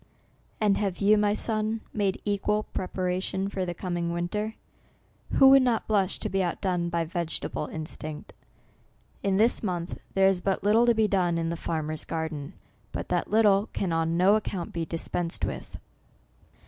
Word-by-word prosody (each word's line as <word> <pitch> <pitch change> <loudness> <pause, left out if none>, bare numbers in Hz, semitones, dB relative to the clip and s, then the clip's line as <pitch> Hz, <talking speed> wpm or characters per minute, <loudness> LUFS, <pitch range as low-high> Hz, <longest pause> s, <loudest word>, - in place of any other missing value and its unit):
And 210 -3 +3
have 195 -3 -1
you, 210 +1 +5
my 210 0 +2
son, 215 0 -1
made 200 -3 0
equal 210 +1 0
prepar 185 -1 -2
ation 190 +1 -2
for 190 -2 -3
the 175 - -3
coming 175 -2 -2
winter? 210 +6 -2 0.8
Who 270 - +7
would 270 0 +8
not 245 -3 +1
blush 200 -3 +1
to - - -2
be 195 0 0
outdone 175 -1 -1
by 170 -1 0
vegetable 165 -2 -3
instinct! 155 -1 -7 0.9
In 195 -1 +1
this 225 +4 +3
month 180 -4 -3 0.2
there 195 0 +5
is 190 -2 +2
but 190 0 -1
little 220 +4 +4
to 235 - +5
be 220 -1 +3
done 180 -4 +1
NOVEMBER, - - 0
l9o - - 0
in 165 - -1
the 170 - -2
farmers 155 -2 -3
garden, 160 -3 -4 0.4
but - - -5
that - - 0
little 210 -1 +4
can 185 -4 -1
on 165 +1 +1
no 185 +3 +5
account 195 -5 -3
be 165 -1 -2
dispensed 165 0 -2
with. - - -6
190 Hz, 175 wpm, -27 LUFS, 170-210 Hz, 0.9 s, would